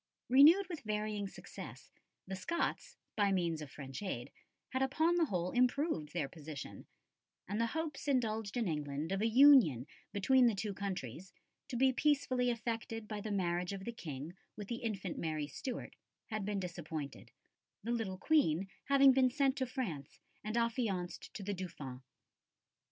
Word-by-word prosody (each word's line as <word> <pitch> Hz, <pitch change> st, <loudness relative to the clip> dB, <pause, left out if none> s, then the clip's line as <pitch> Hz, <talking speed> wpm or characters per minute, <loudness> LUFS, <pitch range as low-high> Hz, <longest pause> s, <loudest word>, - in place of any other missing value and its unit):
Renewed 310 Hz, +10 st, +7 dB
with 340 Hz, -4 st, -5 dB
varying 210 Hz, -1 st, -2 dB
success, -, -, -10 dB, 0.3 s
the 190 Hz, -, -4 dB
Scots, 340 Hz, -, -2 dB, 0.2 s
by 205 Hz, -2 st, +3 dB
means 170 Hz, -4 st, 0 dB
of 150 Hz, -, -7 dB
French 135 Hz, +2 st, -7 dB
aid, 125 Hz, -12 st, -4 dB, 0.4 s
had 260 Hz, -, -1 dB
upon 315 Hz, +6 st, +3 dB
the 345 Hz, -1 st, +3 dB
whole 180 Hz, -, -1 dB
improved 250 Hz, -, +1 dB
their 165 Hz, -5 st, -1 dB
position, 150 Hz, -2 st, -8 dB, 0.6 s
and 205 Hz, +4 st, -1 dB
the 230 Hz, -, +2 dB
hopes 315 Hz, -3 st, -3 dB
indulged 225 Hz, -5 st, 0 dB
in 230 Hz, -4 st, +1 dB
England 150 Hz, 0 st, -2 dB
of 195 Hz, +1 st, 0 dB
a 225 Hz, -, +3 dB
union 230 Hz, -, +7 dB, 0.3 s
between 245 Hz, +5 st, +4 dB
the 225 Hz, -, +2 dB
two 205 Hz, +1 st, -3 dB
countries, 185 Hz, -, -5 dB, 0.3 s
to 270 Hz, -, -5 dB
be 260 Hz, +2 st, +4 dB
peacefully 255 Hz, -3 st, +2 dB
effected 225 Hz, -1 st, -3 dB
by 210 Hz, -1 st, -4 dB
the 215 Hz, -, -4 dB
marriage 180 Hz, -2 st, 0 dB
of 195 Hz, -1 st, -6 dB
the 235 Hz, -, -4 dB
King 155 Hz, -, -6 dB, 0.2 s
with 205 Hz, -2 st, -7 dB
the 235 Hz, -, -2 dB
infant 200 Hz, -7 st, -3 dB
Mary 155 Hz, -2 st, -1 dB
Stuart, 250 Hz, -, -6 dB, 0.4 s
had 215 Hz, -1 st, -2 dB
been 205 Hz, -1 st, -1 dB
disappointed, 160 Hz, -5 st, -6 dB, 0.5 s
the 235 Hz, -, -2 dB
little 220 Hz, -6 st, -1 dB
Queen 190 Hz, -, +2 dB, 0.2 s
having 275 Hz, 0 st, +7 dB
been 260 Hz, -1 st, +4 dB
sent 270 Hz, 0 st, +2 dB
to 260 Hz, -, 0 dB
France 190 Hz, -, -5 dB, 0.2 s
and 215 Hz, +2 st, -2 dB
affianced 225 Hz, -7 st, -1 dB
to 205 Hz, -, -5 dB
the 205 Hz, +1 st, -2 dB
Dauphin. 150 Hz, -9 st, -6 dB
210 Hz, 160 wpm, -35 LUFS, 175-255 Hz, 0.6 s, Renewed